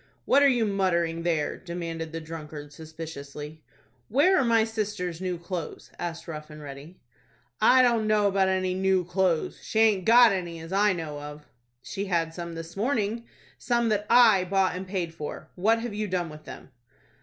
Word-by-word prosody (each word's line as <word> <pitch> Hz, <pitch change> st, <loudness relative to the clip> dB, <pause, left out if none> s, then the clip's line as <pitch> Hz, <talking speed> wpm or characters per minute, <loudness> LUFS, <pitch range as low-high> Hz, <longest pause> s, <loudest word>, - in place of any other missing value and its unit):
"What 280 Hz, -, +4 dB
are 285 Hz, -, +7 dB
you 245 Hz, -4 st, +2 dB
muttering 170 Hz, -5 st, 0 dB
there?" 165 Hz, -3 st, -1 dB
demanded 165 Hz, -2 st, -5 dB
the 165 Hz, -, -4 dB
drunkard, 155 Hz, -2 st, -8 dB
suspiciously. 155 Hz, -1 st, -9 dB, 0.5 s
"Where 305 Hz, -, +4 dB
are -, -, +3 dB
my 230 Hz, -2 st, +4 dB
sister's 210 Hz, -6 st, -3 dB
new 180 Hz, -1 st, -2 dB
clothes?" 170 Hz, -1 st, -6 dB
asked 170 Hz, -1 st, -5 dB
Rough 155 Hz, -2 st, -7 dB
and 150 Hz, 0 st, -11 dB
Ready. 145 Hz, +4 st, -10 dB, 0.6 s
"I 255 Hz, 0 st, +6 dB
don't 235 Hz, -3 st, +2 dB
know 215 Hz, -1 st, +3 dB
about 195 Hz, -1 st, +2 dB
any 185 Hz, -1 st, 0 dB
new 190 Hz, -1 st, +1 dB
clothes. 180 Hz, -2 st, 0 dB
She -, -, -5 dB
aint 210 Hz, -5 st, +3 dB
got 240 Hz, 0 st, +7 dB
any 175 Hz, -3 st, -3 dB
as 165 Hz, +3 st, -8 dB
I 205 Hz, +1 st, +4 dB
know 155 Hz, -4 st, -5 dB
of." 150 Hz, 0 st, -9 dB, 0.4 s
"She 200 Hz, +7 st, -4 dB
had 165 Hz, -4 st, 0 dB
some 170 Hz, -1 st, -6 dB
this 165 Hz, 0 st, -8 dB
morning,—some 235 Hz, +1 st, -2 dB
that 210 Hz, -1 st, 0 dB
I 220 Hz, -6 st, +6 dB
bought 190 Hz, 0 st, +1 dB
and 185 Hz, +1 st, -6 dB
paid 180 Hz, -4 st, -3 dB
for. 155 Hz, -3 st, -7 dB
What 225 Hz, +5 st, +2 dB
have 235 Hz, -2 st, -4 dB
you 210 Hz, 0 st, -2 dB
done 180 Hz, -3 st, -2 dB
with 155 Hz, 0 st, -12 dB
them?" -, -, -11 dB
185 Hz, 180 wpm, -26 LUFS, 165-210 Hz, 0.6 s, are